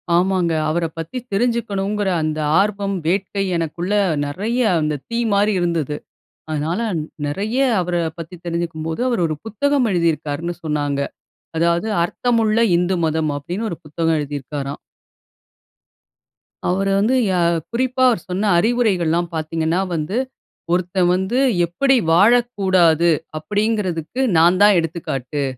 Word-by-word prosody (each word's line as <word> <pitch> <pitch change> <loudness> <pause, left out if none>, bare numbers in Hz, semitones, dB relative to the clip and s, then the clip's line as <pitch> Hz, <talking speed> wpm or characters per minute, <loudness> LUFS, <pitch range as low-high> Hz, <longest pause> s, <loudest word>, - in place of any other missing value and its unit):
ஆமாங்க. 180 -1 +2 0.2
அவர 165 +2 0
பத்தி 165 +10 -5
தெரிஞ்சுக்கனுங்கற 205 -3 0
அந்த 155 0 -2 0.2
ஆர்வம், 200 -1 0
வேட்கை 195 +3 0
எனக்குள்ள 170 +4 -2 0.3
நெறைய 210 - -2 0.2
அந்த 150 -2 -1
தீ 230 - -1
மாரி 205 +1 +3
இருந்தது. 165 -4 -1 0.6
அதனால, 155 +6 -1 0.5
நெறைய 205 - -2 0.2
அவர 175 0 -1 0.2
பத்தி 165 +2 -8
தெரிஞ்சுக்கும்போது, 165 -1 -3
அவர் 235 -7 0
ஒரு 155 - -2
புத்தகம் 270 +4 +1
எழுதியிருக்காருன்னு 170 -1 -1
சொன்னாங்க. 145 -2 -1 0.6
அதாவது 170 +5 +1 0.2
"அர்த்தமுள்ள 225 +1 +1 0.2
இந்து 180 +2 +1
மதம்" 160 -1 0
அப்டின்னு 180 +10 -4
ஒரு 170 - -4
புத்தகம் 160 +2 0
எழுதியிருக்காறாம். 140 -1 -5 1.9
அவர 195 +2 0
வந்து 235 +6 +2
யா 185 - +1 0.3
குறிப்பா 255 +2 -1
அவரு 225 -8 0
சொன்ன 200 +2 0
அறிவுரைகள்லாம் 175 -6 +1
பாத்தீங்கன்னா 160 +2 -1 0.2
வந்து, 160 +8 -2 0.5
"ஒருத்தன் 180 0 +1
வந்து 190 +7 0 0.3
எப்படி 270 +11 +2
வாழக்கூடாது? 190 -5 +4 0.3
அப்படின்கிறதுக்கு, 205 - -1 0.2
நான் 175 +3 +5
தான் 205 -3 +6
எடுத்துக்காட்டு 150 -4 -3
175 Hz, 115 wpm, -20 LUFS, 160-210 Hz, 1.9 s, தான்